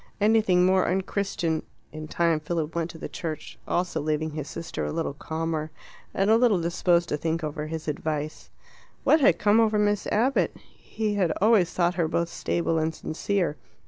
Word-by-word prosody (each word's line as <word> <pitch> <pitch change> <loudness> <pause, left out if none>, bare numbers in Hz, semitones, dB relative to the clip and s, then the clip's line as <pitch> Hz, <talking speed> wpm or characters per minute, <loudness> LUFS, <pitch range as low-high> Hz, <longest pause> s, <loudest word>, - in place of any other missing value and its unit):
Anything 210 -4 +4
more 185 0 +3
unchristian 185 -3 -1 0.2
" - - -38
In 155 0 -7
time 165 -1 +1
Philip 160 0 -3
went 170 0 -2
to 165 - -9
the - - -6
church 155 -2 -6
also, 175 -3 -1
leaving 155 +1 -1
his 150 -1 -5
sister 165 - -5
a 75 - -2
little - - -2
calmer 160 +1 -3 0.4
and 195 +2 +1
a 225 - +6
little 230 -6 +4
disposed 170 0 +2
to 150 - 0
think 160 +2 -2
over 150 0 -3
his 160 0 -5
advice. 155 0 -3 0.5
What 310 - +5
had 175 -10 +5
come 210 +4 +4
over 220 -2 +3
Miss 205 -1 +1
Abbott? 245 +6 +1
He 215 -1 -4
had 185 -5 +1
always 200 -4 +4
thought 175 0 +1
her 160 - +2
both 170 +1 -1
stable 165 -1 -1
and 160 0 -1
sincere. 175 -1 -1
170 Hz, 180 wpm, -26 LUFS, 155-195 Hz, 0.5 s, a